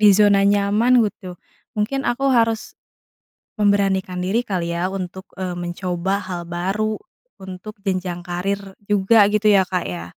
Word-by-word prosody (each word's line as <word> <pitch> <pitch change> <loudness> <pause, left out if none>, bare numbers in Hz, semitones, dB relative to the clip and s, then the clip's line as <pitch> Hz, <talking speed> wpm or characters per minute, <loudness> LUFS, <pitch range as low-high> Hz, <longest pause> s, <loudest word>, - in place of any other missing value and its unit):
di 210 - +6
zona 200 -1 +5
nyaman 205 +4 +3 0.2
gitu, 190 - -15 0.5
mungkin 270 +6 0
aku 270 +3 -2
harus 225 -1 +1 0.9
memberanikan 195 -2 +2
diri 205 +6 +1
kali 175 -5 -2
ya 170 - -2 0.2
untuk, 190 +1 -6 0.2
eee, 180 -2 -3
mencoba 175 +1 -2 0.2
hal 175 -1 -3
baru, 195 +6 -2 0.4
untuk 190 +3 -8
jenjang 185 -2 -2
karir 185 +3 -2 0.3
juga 205 +1 +5
gitu 215 0 +1
ya, 190 - +4
Kak, 180 - 0
ya? 85 -1 -5
195 Hz, 140 wpm, -21 LUFS, 180-210 Hz, 0.9 s, di